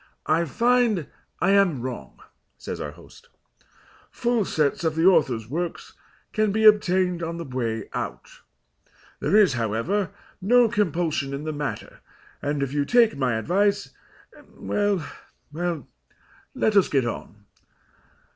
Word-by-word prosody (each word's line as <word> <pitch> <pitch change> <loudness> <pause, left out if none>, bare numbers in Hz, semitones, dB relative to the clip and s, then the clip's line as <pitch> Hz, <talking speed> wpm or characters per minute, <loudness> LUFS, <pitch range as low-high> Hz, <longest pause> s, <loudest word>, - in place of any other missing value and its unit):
"I 165 +2 +2
find 235 - +2 0.4
I 195 - +3
am 185 -11 +3
wrong," 120 - -7 0.4
says - - -6
our - - -4
host. - - -17 0.8
"Full 235 -3 0
sets 150 -1 0
of 160 -1 0
the 165 +1 +1
author's 135 - +3
works 170 +6 -4 0.4
can 215 -2 +1
be 220 +2 0
obtained 185 -4 +4
on 165 0 -4
the 170 - -5
way 115 -5 -3
out. - - -6 0.8
There - - +1
is, 200 -9 +5
however, 120 - -1 0.3
no 240 +5 +5
compulsion 165 -9 -1
in 140 - -6
the 155 0 -3
matter, 145 -1 -5 0.4
and, 145 0 -1
if 135 0 -4
you 145 -1 +1
take 235 +5 +4
my 130 -4 0
advice 200 - +1 0.6
well, 205 -5 -1 0.5
well, 170 -1 -3 0.7
let 220 -5 +1
us 200 - +5
get 135 -4 +1
on. 105 -3 -7
170 Hz, 135 wpm, -24 LUFS, 140-205 Hz, 0.8 s, is